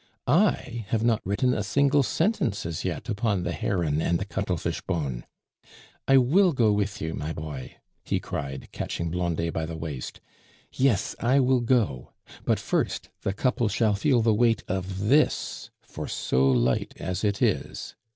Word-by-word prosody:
I 125 - +1
have 110 +1 0
not 115 -2 +2
written 125 +7 +1
a 105 - -1
single 140 +8 +3
sentence 140 - 0
as 85 0 -4
yet 90 +5 -3
upon 105 -4 0
the 85 - -2
Heron 80 -4 0
and 85 - +1
the 100 - -4
Cuttlefish 95 -4 -2
bone. 70 -9 -3 0.8
I 135 - +6
will 170 +8 +4
go 115 -5 +3
with 105 -3 -1
you, 80 0 -2
my 75 0 -4
boy," 75 -5 -7 0.3
he - - -1
cried, 70 -1 -5
catching 85 -1 -3
Blondet 85 -1 -1
by 80 0 -2
the 80 0 -6
waist; 75 -5 -6 0.5
"yes, 120 -6 +1
I 130 +4 +3
will 130 -1 +3
go; 115 - 0 0.3
but - - +2
first, - - -1
the - - -1
couple 120 +3 0
shall 105 +1 +2
feel 120 +3 +2
the 110 -1 +4
weight 115 +1 +2
of 95 +2 -3
this, 145 +6 +2
for - - -7
so 65 +1 +1
light 65 -1 +1
as 95 +3 -3
it 100 -2 +1
is." - - -1
100 Hz, 165 wpm, -26 LUFS, 85-120 Hz, 0.8 s, I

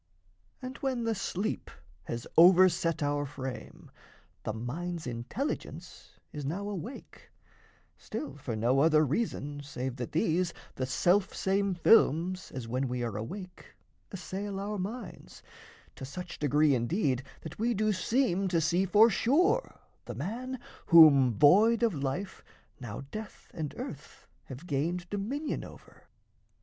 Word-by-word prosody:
And 255 +1 -6
when 260 -3 -2
the 230 0 0
sleep 200 0 -3 0.4
has 115 0 -5
overset 175 -2 +5
our 145 0 0
frame, 130 -2 -8 0.5
The - - -3
mind's 160 +10 -5
intelligence 125 - -5 0.2
is 150 - -5
now 180 +9 -3
awake, 205 - -8 0.7
Still 300 - -6
for 130 -5 -5
no 120 +5 +2
other 155 +1 +5
reason, 145 - -2
save 130 -3 -5
that 120 -2 -5
these 170 +2 0 0.2
The 130 - -3
self 185 +8 +2
same 195 0 0
films 180 -1 +3
as 125 -3 -6
when 130 +3 -1
we 125 0 -3
are 115 -4 -3
awake 180 - -8 0.4
Assail 195 +1 -5
our 205 +1 -3
minds, 205 +1 -7 0.5
to - - -8
such 180 +7 -7
degree 150 0 +3
indeed 130 - 0 0.2
That 160 - -9
we 235 +1 +1
do 215 +1 +1
seem 195 -1 +1
to 175 -2 +1
see 175 +4 +1
for 215 +4 +6
sure 360 - +1 0.2
the 120 - -7
man 235 - -4 0.3
Whom, 145 -6 +8
void 205 - +5
of 230 -4 +3
life, 140 +7 -4 0.4
now 115 -3 -6
death 215 -1 -9
and 155 -4 -5
earth - - -8 0.2
have 130 +6 -9
gained 170 +4 -2
Dominion 250 +10 -3
over. - - -15
175 Hz, 135 wpm, -30 LUFS, 135-205 Hz, 0.7 s, Whom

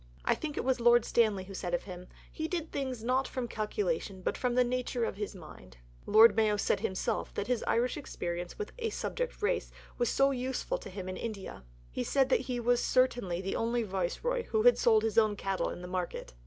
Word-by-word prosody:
I - - +4
think 300 -2 -5
it - - -1
was 260 -1 +1
Lord 240 0 +5
Stanley 215 -5 +2
who 195 +1 -10
said 175 -2 -2
of - - -4
him, 180 -2 -9 0.2
'He 315 - -3
did 335 -2 -3
things 260 -5 -3
not 255 +3 +1
from 255 -2 -3
calculation, 215 - -2
but - - 0
from 250 -1 -1
the 250 - +5
nature 250 0 -1
of 195 - -4
his 210 0 -4
mind.' 65 - -13 0.3
Lord 220 +2 +7
Mayo 215 -2 +3
said - - +1
himself 205 +4 -2
that - - -1
his 245 -1 0
Irish 245 +4 +1
experience 175 -10 -5
with 425 - -5
'a 455 -1 -1
subject - - -3
race' - - 0 0.3
was 240 - +2
so 275 0 +3
useful 265 - -2
to - - -9
him 190 -1 -7
in 185 - -4
India. 200 - -6 0.3
He 90 - -2
said 270 - +2
that - - +4
he 245 -1 -1
was 240 +1 +2
certainly 245 -9 +1
the 195 0 -3
only 235 +1 0
Viceroy 215 - -2
who 435 -1 0
had - - +6
sold 220 -2 +4
his 225 0 +3
own 215 -2 +2
cattle 195 -1 -1
in 175 - -7
the - - -6
market." 180 -1 -4
230 Hz, 220 wpm, -31 LUFS, 195-260 Hz, 0.3 s, Lord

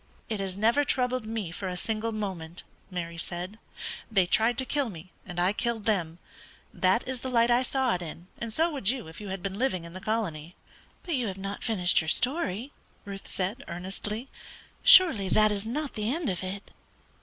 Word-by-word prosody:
"It 215 -2 -2
has 190 -1 -3
never 230 +7 +4
troubled 255 -3 0
me 220 -6 -3
for 190 +2 -5
a 180 -1 -3
single 220 +4 -1
moment," 185 -6 -4 0.3
Mary 170 -2 -4
said. 180 +5 -5 0.5
"They 195 -4 +4
tried 225 +6 +3
to 260 - +2
kill 280 -2 0
me, 180 -1 -10 0.2
and 175 -1 -4
I 180 +3 +3
killed 225 -1 -1
them. 175 -7 +1 0.6
That 190 +6 +2
is 255 -1 -4
the 260 - -3
light 235 -1 +4
I 240 +1 +5
saw 260 -1 +1
it 180 - -2
in, 170 +1 -7
and 230 -1 -4
so 325 +8 +2
would 270 -10 0
you 255 -7 -1
if 160 +5 -10
you 205 - -6
had 190 -1 -5
been 195 +1 -3
living 235 -10 +1
in 170 - -10
the 185 - -8
colony." 180 -7 -2 0.5
"But 345 - -3
you 250 -5 +1
have 190 -1 -4
not 195 +1 -5
finished 185 -8 +3
your 160 - -6
story," 250 - +1 0.3
Ruth 200 -1 -7
said, 205 +9 -2
earnestly. 195 +7 -5 0.5
"Surely 360 - +8
that 215 +3 +5
is 205 +1 -3
not 290 +4 -2
the 215 +2 -1
end 310 - 0
of 180 0 -4
it!" 195 +2 -5
210 Hz, 200 wpm, -28 LUFS, 185-245 Hz, 0.6 s, Surely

